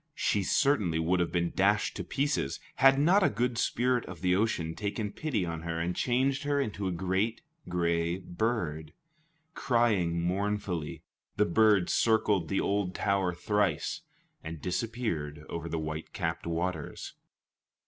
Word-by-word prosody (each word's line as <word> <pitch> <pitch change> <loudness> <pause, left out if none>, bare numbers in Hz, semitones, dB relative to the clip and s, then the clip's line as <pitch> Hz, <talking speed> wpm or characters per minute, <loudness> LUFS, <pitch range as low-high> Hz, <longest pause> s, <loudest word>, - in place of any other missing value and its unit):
She 105 - +1
certainly 100 - +2
would 85 +3 +1
have 85 - 0
been 85 -1 0
dashed 100 +2 +2
to - - -3
pieces, 140 - -1 0.2
had 135 0 +6
not 175 +8 +4
a - - +4
good 120 +2 -1
spirit 125 0 +1
of 90 -2 -9
the 90 -1 +3
ocean 95 -6 0
taken 105 +2 -3
pity 115 - -2
on 80 -1 -4
her, 85 0 -3
and 85 +2 -1
changed 135 +3 +1
her 145 -1 0
into 105 -7 -2
a - - 0
great 95 +6 -1 0.3
gray 85 0 0
bird. 85 -6 -2 0.6
Crying 105 -9 +1
mournfully, 95 -2 -2 0.3
the 105 - +4
bird 105 0 +4
circled 110 -6 +2
the 95 - +1
old 100 -2 0
tower 95 -2 +1
thrice, 100 -2 0 0.4
and 80 0 -6
disappeared 90 - -3
over 85 0 -4
the 80 - -2
white 80 0 -5
capped - - -3
waters. 85 -2 -3
95 Hz, 150 wpm, -30 LUFS, 85-110 Hz, 0.6 s, had